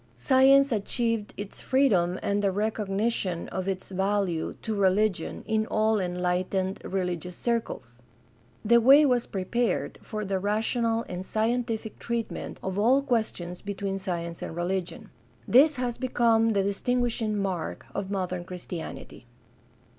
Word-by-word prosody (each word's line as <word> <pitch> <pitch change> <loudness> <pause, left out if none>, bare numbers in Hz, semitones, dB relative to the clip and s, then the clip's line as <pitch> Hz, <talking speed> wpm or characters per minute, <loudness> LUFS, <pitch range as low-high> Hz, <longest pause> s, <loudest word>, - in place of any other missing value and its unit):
Science 275 +1 +5
achieved 225 0 -1
its 205 0 -7
freedom 190 -10 +2
and 200 0 +1
the 200 -1 +2
recognition 205 -2 -1
of 190 0 -4
its 190 -1 -3
value 190 -3 -1
to 220 - -2
religion 200 -2 +1
in 220 0 0
all 215 0 +2
enlightened 180 +1 -1
religious 180 -2 -3
circles. 135 - -3 0.6
The 235 +2 +5
way 275 +5 +7
was 250 -3 +2
prepared 200 +2 -1
for 215 -1 -5
the 190 -1 -1
rational 225 +3 0
and 180 0 -5
scientific 225 +1 -2
treatment 235 -1 -4
of 190 +1 -2
all 255 +6 +4
questions 215 -9 -2
between 195 -1 -3
science 170 -3 -4
and - - -5
religion. 180 +1 -3 0.4
This 285 +5 +6
has 245 -2 -3
become 230 -3 +2
the 200 -1 +2
distinguishing 225 +1 0
mark 190 -4 -3
of 195 -1 -3
modern 185 -3 -2
Christianity. 175 -8 -8
205 Hz, 130 wpm, -27 LUFS, 185-230 Hz, 0.6 s, way